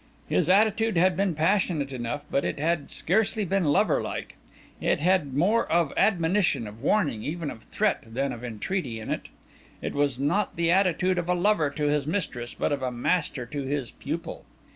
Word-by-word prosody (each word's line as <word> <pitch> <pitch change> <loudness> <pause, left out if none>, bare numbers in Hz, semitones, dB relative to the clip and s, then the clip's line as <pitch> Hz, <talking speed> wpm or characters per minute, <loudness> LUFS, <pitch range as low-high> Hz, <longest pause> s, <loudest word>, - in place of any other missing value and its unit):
His 175 -1 +1
attitude 215 +1 +3
had 180 +1 +4
been 195 -3 0
passionate 160 -4 +1
enough, 125 +4 -4
but 140 - +1
it - - -2
had 155 0 0
scarcely 215 +3 +1
been 190 0 +1
lover 145 -1 +3
like. - - -5 0.4
It - - +1
had 160 -5 +1
more 205 +10 +2
of 170 -3 +2
admonition, 175 - +2
of 105 +2 -10
warning, 145 - +1
even 160 +4 -3
of 110 -2 -12
threat, 210 -1 0
than 135 +4 -2
of 120 0 -9
entreaty 125 - -3
in 110 - -6
it. - - -3 0.5
It - - -4
was 140 -3 0
not 150 +10 0
the 170 0 +2
attitude 185 -1 +2
of 175 0 -4
a 180 - +3
lover 175 -4 +2
to 150 +1 -5
his 145 -1 +1
mistress, 145 -9 -3
but - - -1
of 140 -2 -1
a 130 - 0
master 125 +1 -1
to 140 +4 -5
his 135 -2 -3
pupil. - - -5
160 Hz, 185 wpm, -26 LUFS, 140-185 Hz, 0.5 s, had